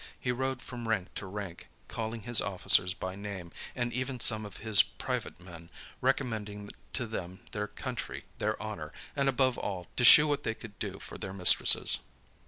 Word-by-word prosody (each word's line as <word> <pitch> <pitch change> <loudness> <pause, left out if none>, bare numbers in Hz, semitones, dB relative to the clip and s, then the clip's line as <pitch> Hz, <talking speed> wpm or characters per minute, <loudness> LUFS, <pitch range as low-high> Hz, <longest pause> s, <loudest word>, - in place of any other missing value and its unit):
He 125 - -1
rode 130 +1 -3
from 120 -2 -7
rank 100 -5 -2
to 100 - -7
rank, 95 -3 -7 0.2
calling 115 0 -5
his 120 -1 +5
officers 90 -1 +4
by 95 0 -5
name, 100 -4 -7 0.2
and 120 -1 -2
even 130 0 -3
some 110 -2 +4
of 100 - -12
his 110 -2 +6
private - - -5
men, 85 -2 -12 0.3
recommending 110 -6 -2 0.2
to 125 - -2
them 95 -4 -7
their 105 0 -3
country, 120 +4 -6
their 110 +1 -1
honor, 105 -8 -6 0.2
and, 140 -1 +1
above 130 -1 +1
all, 90 -3 -4
to 125 - +1
shew 150 +5 +9
what 145 -1 0
they 110 - -3
could 105 -4 -12
do - - -4
for - - -10
their 95 - -6
mistresses. 90 -2 +5
110 Hz, 180 wpm, -30 LUFS, 95-125 Hz, 0.3 s, shew